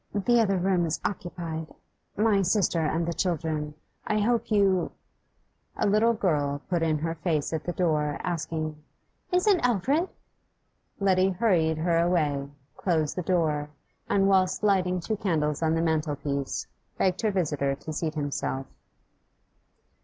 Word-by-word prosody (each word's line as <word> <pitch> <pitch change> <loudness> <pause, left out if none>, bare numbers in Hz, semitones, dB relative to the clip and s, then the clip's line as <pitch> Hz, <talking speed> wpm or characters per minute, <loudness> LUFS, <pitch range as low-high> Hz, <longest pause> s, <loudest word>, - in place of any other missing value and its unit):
'The 235 +4 +3
other 195 -3 +2
room 185 -1 +2
is 160 - -2
occupied 170 -4 -4 0.5
my 210 -2 +3
sister 185 -2 +2
and 160 +1 0
the 170 - -2
children; 155 -3 -2 0.3
I 215 - +1
hope 230 +2 +1
you 195 -4 +2 0.4
' - - -34
A - - +1
little 215 +3 +3
girl 145 -8 0
put 175 -2 +1
in 160 -2 +2
her 165 +2 -2
face 165 -2 -1
at 160 -1 -3
the 175 - -1
door, 150 -5 0
asking 155 -3 -3 0.5
'Is 360 0 +2
it 400 -4 +5
Alfred?' 255 - +1 0.9
Letty 190 -1 +3
hurried 175 -5 +2
her 165 +1 +2
away, 150 -5 +1 0.3
closed 160 -5 0
the 180 - -1
door, 160 -5 0 0.4
and, 195 -1 +3
whilst 190 0 +2
lighting 185 -3 +2
two 215 +4 -2
candles 155 -6 0
on 160 0 +2
the 165 - +1
mantelpiece, 145 -3 -1 0.3
begged 185 -1 +1
her 220 - +2
visitor 150 -8 0
to 155 +3 -7
seat 155 0 -2
himself. 140 -2 -2
170 Hz, 145 wpm, -27 LUFS, 155-195 Hz, 0.9 s, it